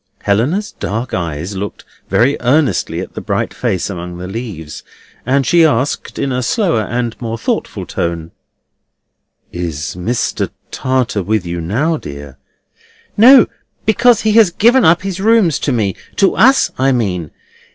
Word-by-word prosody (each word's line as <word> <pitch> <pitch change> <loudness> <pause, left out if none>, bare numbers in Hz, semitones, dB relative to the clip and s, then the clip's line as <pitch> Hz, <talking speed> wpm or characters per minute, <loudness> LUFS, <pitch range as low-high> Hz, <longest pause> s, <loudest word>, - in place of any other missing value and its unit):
Helena's 140 - 0
dark 115 +5 -4
eyes 85 +2 -3
looked 100 +2 -6 0.2
very 130 +5 +3
earnestly 140 +4 +1
at - - -8
the - - -6
bright - - -2
face 90 - -2
among 90 -2 -6
the 90 - -7
leaves, 95 -8 -7 0.5
and 135 +1 +2
she 170 +4 +4
asked, 145 -3 0
in 140 - -1
a 125 0 -1
slower 145 - +1
and 120 +1 -3
more 115 -1 -3
thoughtful 115 - -3
tone: 85 -1 -3 1.2
"Is 80 -4 -4
Mr. 115 +7 -2 0.2
Tartar 130 -5 -1
with 105 0 -1
you 85 0 -4
now, 140 - 0
dear?" 70 - -10 0.8
"No; 250 +4 +8 0.4
because 235 +2 +4
he 220 - +1
has 220 -3 +6
given 235 +8 +3
up 170 +3 +4
his 195 -2 -4
rooms 210 -6 +3
to 145 - -1
me—to 115 - 0
us, 265 +6 +4
I 135 +1 +3
mean. 95 - -1
120 Hz, 145 wpm, -16 LUFS, -, 1.2 s, No